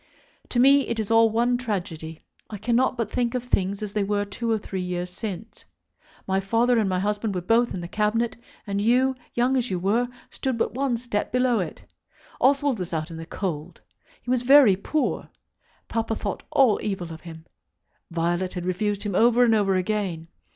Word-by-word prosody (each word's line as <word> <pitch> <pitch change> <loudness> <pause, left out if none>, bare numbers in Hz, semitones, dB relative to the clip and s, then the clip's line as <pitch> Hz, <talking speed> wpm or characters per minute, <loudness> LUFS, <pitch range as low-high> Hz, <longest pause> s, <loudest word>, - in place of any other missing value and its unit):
To 240 - 0
me 275 +2 +5
it 230 -1 -2
is 220 0 -2
all 225 0 +6
one 240 +2 +1
tragedy. 170 -9 -5 0.3
I 210 - -6
cannot 240 +5 +1
but 230 -3 -2
think 245 0 0
of 250 - -1
things 200 -4 -1
as 205 -1 -5
they 210 -2 +1
were 205 0 0
two 230 +3 -4
or 220 - +3
three 195 -2 -5
years 180 0 -3
since. 215 +2 -7 0.6
My 190 0 +1
father 230 +5 +2
and 210 -3 +1
my 185 - 0
husband 205 +1 -1
were 180 - -1
both 230 +6 +2
in 180 - -4
the 170 - -6
Cabinet, 215 +4 0 0.3
and 200 -1 -2
you, 250 +4 +3 0.2
young 245 +2 +2
as 250 -2 0
you 185 - -1
were, 215 +7 +1 0.2
stood 260 -3 -2
but - - -1
one 260 -1 0
step 230 -3 -3
below 250 -1 +2
it. 175 -4 -5 0.6
Oswald 275 -2 +2
was 180 -2 -5
out 160 +1 -3
in 165 - -7
the 165 0 -8
cold. 165 -4 -4 0.4
He 245 - -3
was 255 -2 +2
very 260 -5 +7
poor. 295 +10 -2 0.6
Papa 225 -1 -1
thought 200 -3 -4
all 255 -7 +4
evil 185 -5 -3
of 160 - -11
him. 160 -2 -11 0.6
Violet 175 +2 -1
had 180 -1 -4
refused 200 +3 -1
him 205 -2 -3
over 240 +5 +5
and 235 -2 +4
over 200 -3 +2
again. 185 -4 -2
210 Hz, 195 wpm, -25 LUFS, 185-240 Hz, 0.6 s, very